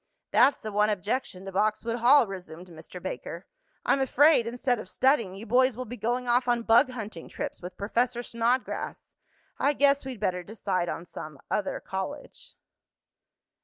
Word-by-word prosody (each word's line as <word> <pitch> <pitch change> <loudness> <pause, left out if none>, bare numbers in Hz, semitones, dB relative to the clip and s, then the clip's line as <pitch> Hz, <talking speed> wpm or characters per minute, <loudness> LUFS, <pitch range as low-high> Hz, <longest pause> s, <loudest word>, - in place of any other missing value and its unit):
"That's 280 - +4
the 215 - -4
one 210 +1 +3
objection 205 -1 -2
to 195 - -6
Boxwood 215 +4 0
Hall," 250 +3 +6
resumed 180 -3 -9
Mr. 160 -1 -10
Baker. - - -6 0.4
"I'm 275 - +3
afraid 265 -1 +4
instead 245 0 0
of 200 - -8
studying, 235 -8 +2
you 205 +3 -8
boys 250 +1 +3
will 255 - -4
be 245 +1 -7
going 245 +1 -2
off 245 +1 +2
on 240 -1 +1
bug 230 +3 +5
hunting 215 -9 -7
trips - - -5
with 180 +1 -8
Professor 240 +4 0
Snodgrass. 235 +2 -2 0.5
I 285 - +3
guess 280 0 +3
we'd 260 -4 -6
better 185 -3 -1
decide 185 -2 -2
on 170 - -5
some 155 -4 -9
other 205 - -1
college." 190 +10 -7
230 Hz, 165 wpm, -27 LUFS, 195-250 Hz, 0.5 s, Hall